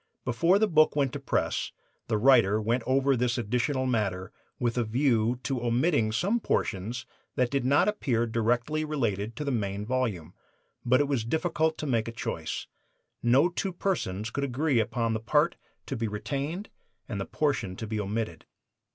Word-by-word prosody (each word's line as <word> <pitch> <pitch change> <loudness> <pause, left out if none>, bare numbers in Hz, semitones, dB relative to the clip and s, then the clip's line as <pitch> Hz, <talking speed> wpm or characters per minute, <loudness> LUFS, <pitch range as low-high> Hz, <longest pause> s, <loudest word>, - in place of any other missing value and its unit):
Before 170 +10 +3
the 220 +1 +3
book 155 -5 +4
went 140 -3 +1
to 145 - -4
press 135 - -1 0.4
the 110 - +1
writer 110 -4 +5
went 115 +3 0
over 135 +1 +3
this 125 0 0
additional 125 +4 0
matter 100 -7 -1 0.3
with 120 -1 0
a 120 - +1
view 120 0 +1
to 135 -4 -2
omitting 120 -1 +2
some 195 - +1
portions 115 - -2 0.3
that 125 -1 +1
did 140 -2 0
not 140 +8 +4
appear 130 - +1
directly 120 +7 0
related 115 -8 -2
to 150 - -4
the 140 - -1
main 100 -3 -2
volume. 105 -9 -2 0.5
But 130 +3 +4
it 145 - +1
was 135 -5 0
difficult 160 +4 0
to - - -4
make 115 -5 0
a - - -3
choice. 115 - -4 0.6
No 130 +7 +4
two 185 +2 -3
persons 110 - -2
could 140 - -2
agree 140 0 +1
upon 115 +1 0
the 110 - -1
part 150 +9 +2 0.3
to 135 - -4
be 115 -2 -1
retained 140 - -4 0.4
and 100 -4 -4
the - - -3
portion 120 -11 -1
to 110 - -5
be 110 0 -3
omitted. 105 -5 -3
125 Hz, 175 wpm, -28 LUFS, 110-145 Hz, 0.6 s, writer